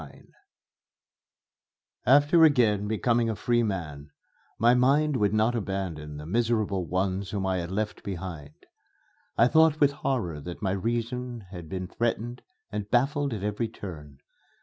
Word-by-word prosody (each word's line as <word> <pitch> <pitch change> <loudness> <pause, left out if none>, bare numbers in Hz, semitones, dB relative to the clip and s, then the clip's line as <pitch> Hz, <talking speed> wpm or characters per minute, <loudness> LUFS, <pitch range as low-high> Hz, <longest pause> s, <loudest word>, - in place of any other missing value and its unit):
XXIX 70 -3 -14 1.8
After 145 +5 +6
again 115 -9 +4
becoming 115 +2 +1
a 110 - -1
free 120 +3 +1
man, 80 -9 -4 0.5
my 120 +2 +5
mind 140 +4 +3
would 105 -5 +2
not 110 +3 +2
abandon 95 -9 -4
the 75 - -8
miserable 110 -2 0
ones 95 +2 -1
whom 100 0 -2
I 95 -1 0
had 85 -1 -4
left 105 +2 -3
behind. 85 -6 -7 0.7
I 115 - +6
thought 160 +2 +4
with 145 -1 +5
horror 110 - -2
that 85 +5 -7
my 95 - +1
reason 120 +4 -2
had 85 -4 -9
been 95 0 -4
threatened 120 +3 -2 0.3
and 105 -1 -4
baffled 140 +4 +1
at 105 -4 -4
every 105 +2 -1
turn. 75 -10 -9
105 Hz, 145 wpm, -27 LUFS, 95-120 Hz, 1.8 s, After